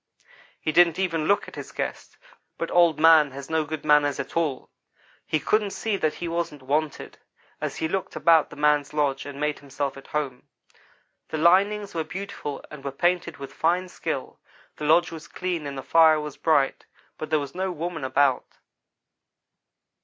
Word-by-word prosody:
He 155 - -1
didn't 170 0 +5
even 165 -5 0
look 200 - +2
at - - -11
his - - -8
guest, - - -5 0.4
but 165 - -4
Old 170 -3 +4
man 160 -2 +7
has 140 +2 -9
no 160 -1 +2
good 155 0 -6
manners 145 -2 +4
at - - -5
all. 155 -6 -1 0.6
He 155 - +1
couldn't 210 +5 +1
see 215 +1 -2
that 155 -5 0
he 175 - -5
wasn't 165 -4 -3
wanted, 150 +3 -2 0.4
as - - -3
he 160 - -1
looked 190 +3 -3
about 165 -2 +4
the - - -11
man's 150 0 +1
lodge 140 -2 0
and 140 -1 -8
made 150 0 -1
himself 140 0 -4
at 135 - -12
home. 140 -5 -4 0.8
The 160 - -4
linings 200 +5 +3
were 165 - -1
beautiful 165 -4 -6
and 150 -2 -10
were 140 - -3
painted 170 +3 0
with 140 -1 -9
fine 180 +3 0
skill. - - -5 0.4
The 150 - -5
lodge 170 +3 +4
was 160 -2 -9
clean 175 -5 -3
and 140 -1 -6
the 135 - -5
fire 160 +2 +5
was 150 -2 -6
bright, 140 -4 +1 0.3
but 155 - -5
there 155 - +3
was 140 -2 -5
no 190 +1 -2
woman 165 -2 -4
about. 130 0 +1
155 Hz, 180 wpm, -25 LUFS, 145-170 Hz, 0.8 s, man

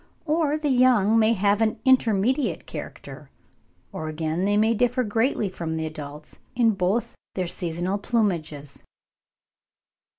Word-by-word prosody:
Or 305 -1 +1
the 300 -2 -1
young 240 -4 +4
may 220 +1 +4
have 205 +1 +1
an 220 -1 +1
intermediate 255 +1 +2
character; - - -9 0.6
or 190 -6 -5
again 160 +3 -2
they 205 +1 +2
may 220 +2 +3
differ 245 +2 +1
greatly 225 0 0
from 165 -3 -4
the 160 - -2
adults 150 -1 -9 0.2
in 235 -2 +4
both 205 +4 -1 0.2
their 185 - -1
seasonal 175 +3 -3
plumages. 170 - -2
205 Hz, 130 wpm, -24 LUFS, 170-240 Hz, 0.6 s, young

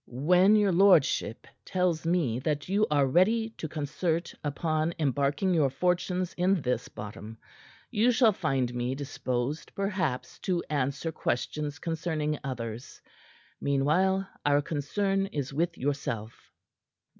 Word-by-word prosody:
"When 180 - +4
your 205 -2 +4
lordship 175 - +3 0.2
tells 180 -3 0
me 160 -10 +1
that 145 +1 -2
you 200 +3 +2
are 145 -2 +3
ready 220 - +2
to 165 - -6
concert 160 +3 -2
upon 155 +2 -1
embarking 145 +5 +1
your 150 -5 +3
fortunes 180 +4 0
in 185 +1 +2
this 125 -3 -2
bottom, 105 +1 -9 0.5
you 220 +4 +3
shall 235 -2 +5
find 135 -9 -1
me 125 +1 -2
disposed, 135 0 -3
perhaps, 185 -10 -2
to 180 -2 -1
answer 140 +3 -1
questions 145 +2 -2
concerning 155 -2 -2
others. 120 -3 -6 0.6
Meanwhile, 180 +8 +2 0.2
our 145 0 +3
concern 195 +7 -1
is 140 -6 -4
with 165 +3 -1
yourself." 125 -5 -4
155 Hz, 120 wpm, -28 LUFS, 135-180 Hz, 0.6 s, shall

